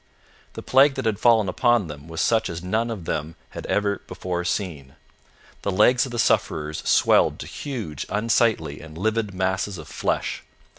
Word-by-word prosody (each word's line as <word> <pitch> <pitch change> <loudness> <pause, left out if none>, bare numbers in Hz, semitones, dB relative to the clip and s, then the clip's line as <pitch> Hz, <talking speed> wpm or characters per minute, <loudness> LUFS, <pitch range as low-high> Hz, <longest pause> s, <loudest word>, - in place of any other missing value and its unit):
The - - -8
plague 135 +1 +5
that 135 -3 -4
had 110 -3 0
fallen 115 -4 +4
upon 120 +2 +2
them 75 -1 -9
was 80 0 -3
such 115 -1 +2
as 85 +1 -6
none 110 +6 0
of 105 -7 -5
them 80 +1 -3 0.2
had - - -7
ever 100 -1 0
before 90 -1 -3
seen. 85 -7 -3 0.7
The - - -2
legs 120 +7 +4
of - - -9
the 120 - -4
sufferers 75 -8 +1
swelled - - +4
to - - -7
huge, 110 - -6
unsightly, 105 -8 +1
and 80 0 -11
livid 110 +2 0
masses 95 +1 -1
of 80 - -10
flesh. - - -2
100 Hz, 175 wpm, -24 LUFS, 80-115 Hz, 0.7 s, plague